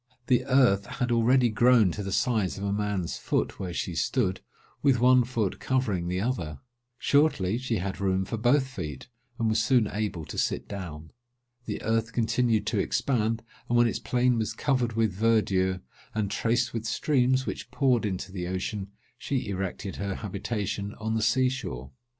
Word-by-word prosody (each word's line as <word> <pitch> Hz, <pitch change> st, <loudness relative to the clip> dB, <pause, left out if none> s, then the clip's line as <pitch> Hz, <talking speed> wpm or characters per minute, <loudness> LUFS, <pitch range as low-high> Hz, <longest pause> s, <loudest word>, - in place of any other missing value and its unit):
The 125 Hz, -1 st, +3 dB
earth 120 Hz, -7 st, +3 dB
had 125 Hz, -4 st, -2 dB
already 120 Hz, +2 st, +4 dB
grown 115 Hz, -3 st, +4 dB
to 105 Hz, -, -5 dB
the 100 Hz, -1 st, -4 dB
size 110 Hz, -7 st, +1 dB
of 100 Hz, -, -5 dB
a 100 Hz, 0 st, 0 dB
man's 100 Hz, -4 st, -2 dB
foot, -, -, -1 dB
where 95 Hz, -2 st, -4 dB
she 85 Hz, +1 st, -3 dB
stood, 95 Hz, +2 st, 0 dB, 0.4 s
with 135 Hz, -4 st, +3 dB
one 125 Hz, +1 st, +6 dB
foot 115 Hz, -5 st, -2 dB
covering 110 Hz, -10 st, 0 dB
the 90 Hz, +1 st, -1 dB
other. 95 Hz, -, -2 dB, 0.4 s
Shortly, 125 Hz, -7 st, +2 dB
she 130 Hz, -3 st, -2 dB
had 95 Hz, -1 st, -3 dB
room 95 Hz, -1 st, +1 dB
for 115 Hz, -, -3 dB
both 125 Hz, +5 st, +3 dB
feet, 85 Hz, -, -7 dB, 0.3 s
and 115 Hz, -3 st, 0 dB
was 110 Hz, 0 st, +2 dB
soon 120 Hz, 0 st, +4 dB
able 105 Hz, -6 st, -3 dB
to -, -, -5 dB
sit -, -, -1 dB
down. 80 Hz, -6 st, -7 dB, 0.5 s
The 105 Hz, -, -4 dB
earth 115 Hz, +1 st, 0 dB
continued 115 Hz, -1 st, +1 dB
to -, -, 0 dB
expand; 115 Hz, -4 st, 0 dB, 0.3 s
and 120 Hz, -, +3 dB
when 120 Hz, -, +6 dB
its 115 Hz, -, 0 dB
plain 125 Hz, -1 st, +1 dB
was 110 Hz, -, -1 dB
covered 125 Hz, -5 st, 0 dB
with 110 Hz, -3 st, +1 dB
verdure, 95 Hz, -3 st, +2 dB, 0.3 s
and 105 Hz, -2 st, -1 dB
traced 115 Hz, +2 st, 0 dB
with 115 Hz, -1 st, -3 dB
streams, 130 Hz, +1 st, +2 dB
which -, -, -5 dB
poured 130 Hz, -4 st, +2 dB
into 95 Hz, -2 st, -3 dB
the 90 Hz, -2 st, -4 dB
ocean, 95 Hz, +2 st, -3 dB, 0.3 s
she 130 Hz, -6 st, -2 dB
erected 95 Hz, 0 st, -4 dB
her 100 Hz, -1 st, -3 dB
habitation 100 Hz, 0 st, -3 dB
on 110 Hz, 0 st, -3 dB
the 110 Hz, -, 0 dB
sea 130 Hz, +4 st, +3 dB
shore. 65 Hz, -, -5 dB
110 Hz, 175 wpm, -27 LUFS, 95-125 Hz, 0.5 s, one